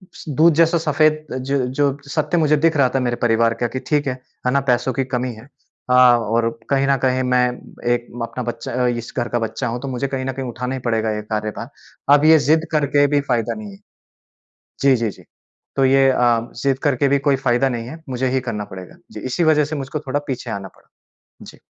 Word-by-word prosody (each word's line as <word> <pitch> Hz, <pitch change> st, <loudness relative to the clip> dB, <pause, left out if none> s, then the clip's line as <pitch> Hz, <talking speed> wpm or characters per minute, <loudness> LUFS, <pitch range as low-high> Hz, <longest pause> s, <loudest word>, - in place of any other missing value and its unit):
स -, -, -10 dB
दूध 160 Hz, +4 st, +4 dB
जैसा 165 Hz, +2 st, +3 dB
सफेद 155 Hz, -1 st, +1 dB, 0.2 s
जो 135 Hz, +2 st, -1 dB
जो 140 Hz, +1 st, 0 dB
सत्य 155 Hz, +4 st, 0 dB
मुझे 150 Hz, -2 st, +3 dB
दिख 165 Hz, -1 st, +4 dB
रहा 135 Hz, -3 st, +4 dB
था -, -, +3 dB
मेरे 120 Hz, -2 st, 0 dB
परिवार 115 Hz, -1 st, +3 dB
का 120 Hz, -, +2 dB
कि 130 Hz, +3 st, -5 dB
ठीक 145 Hz, -2 st, +1 dB
है, 130 Hz, -, 0 dB, 0.3 s
है -, -, +3 dB
ना? 140 Hz, -, +3 dB
पैसों 125 Hz, -1 st, +1 dB
की 135 Hz, -, 0 dB
कमी 125 Hz, -1 st, -2 dB
है। 110 Hz, +4 st, -14 dB, 0.4 s
हाँ 125 Hz, -1 st, +6 dB
और 115 Hz, +1 st, 0 dB, 0.2 s
कहीं 135 Hz, 0 st, +2 dB
न 140 Hz, 0 st, +3 dB
कहीं 130 Hz, 0 st, +2 dB
मैं 125 Hz, -1 st, +3 dB, 0.5 s
एक 120 Hz, 0 st, -3 dB, 0.2 s
अपना 125 Hz, +2 st, -5 dB
बच्चा 120 Hz, +2 st, -5 dB
अ, -, -, +3 dB
इस 120 Hz, -1 st, -3 dB
घर 120 Hz, -1 st, 0 dB
का 120 Hz, -, 0 dB
बच्चा 115 Hz, +1 st, -3 dB
हूँ 120 Hz, +1 st, -3 dB
तो 140 Hz, -, -5 dB
मुझे 130 Hz, +1 st, -2 dB
कहीं 130 Hz, -1 st, -3 dB
न 135 Hz, -, -1 dB
कहीं 135 Hz, 0 st, -5 dB
उठाना 125 Hz, +2 st, -4 dB
ही -, -, -4 dB
पड़ेगा 110 Hz, -2 st, 0 dB
ये 105 Hz, -, -3 dB
कार्यभार। 105 Hz, -1 st, -4 dB, 0.5 s
अब 145 Hz, +1 st, +2 dB
ये 160 Hz, 0 st, +8 dB
जिद्द 160 Hz, +2 st, +3 dB
करके 145 Hz, -2 st, +3 dB
भी 145 Hz, 0 st, +2 dB
फ़ायदा 120 Hz, -4 st, -1 dB
नहीं 105 Hz, -2 st, -8 dB
है। 100 Hz, -, -14 dB, 1.0 s
जी, 140 Hz, -1 st, +5 dB
जी, 115 Hz, -2 st, -1 dB
जी। -, -, -15 dB, 0.5 s
तो 135 Hz, -, +3 dB
ये 135 Hz, 0 st, +5 dB
अ, 120 Hz, -2 st, +1 dB
जिद्द 135 Hz, -1 st, +1 dB
करके 140 Hz, -2 st, +2 dB
भी 140 Hz, +1 st, +3 dB
कोई 140 Hz, -, +4 dB
फ़ायदा 130 Hz, 0 st, +1 dB
नहीं 120 Hz, -3 st, -4 dB
है। 160 Hz, +5 st, -10 dB
मुझे 130 Hz, 0 st, -1 dB
ही 130 Hz, -, +2 dB
करना 115 Hz, -5 st, -4 dB
पड़ेगा। 95 Hz, -2 st, -11 dB
जी, 110 Hz, -, -8 dB
इसी 130 Hz, +9 st, -1 dB
वजह 155 Hz, -1 st, +4 dB
से 155 Hz, +2 st, -4 dB
मुझको 135 Hz, +2 st, -4 dB
थोड़ा 140 Hz, +2 st, -1 dB
पीछे 125 Hz, -2 st, -4 dB
आना 100 Hz, -2 st, -5 dB
पड़ा। -, -, -27 dB, 0.5 s
जी। -, -, -13 dB
130 Hz, 230 wpm, -20 LUFS, 120-140 Hz, 1.0 s, ये